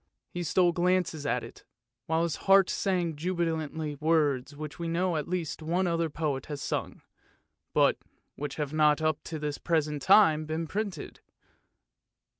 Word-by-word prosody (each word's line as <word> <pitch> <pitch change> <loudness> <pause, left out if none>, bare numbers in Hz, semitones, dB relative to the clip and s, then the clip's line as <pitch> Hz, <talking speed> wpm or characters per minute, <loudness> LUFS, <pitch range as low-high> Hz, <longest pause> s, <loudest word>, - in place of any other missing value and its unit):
He 175 - -4
stole 175 +1 +3
glances 175 -4 0
at 125 -1 0
it, 115 - -12 0.4
while 160 +1 +1
his 170 - -1
heart 195 -1 +6
sang 180 -5 0
jubilantly 160 -3 -2
words 145 -3 +1
which 150 +2 -7
we 170 - -3
know 175 +1 0
at 150 -2 -2
least 175 -3 -3
one 175 +4 0
other 165 -2 0
poet 145 -3 -3
has 145 -2 -5
sung, - - -4 0.7
but - - +3 0.4
which 145 -1 -5
have 150 -1 -3
not 150 -1 +4
up 155 -1 0
to 160 - -5
the 150 -1 -3
present 150 -3 0
time 160 -5 +5
been 160 +1 -2
printed. 195 -2 -4
160 Hz, 155 wpm, -29 LUFS, 150-175 Hz, 0.7 s, heart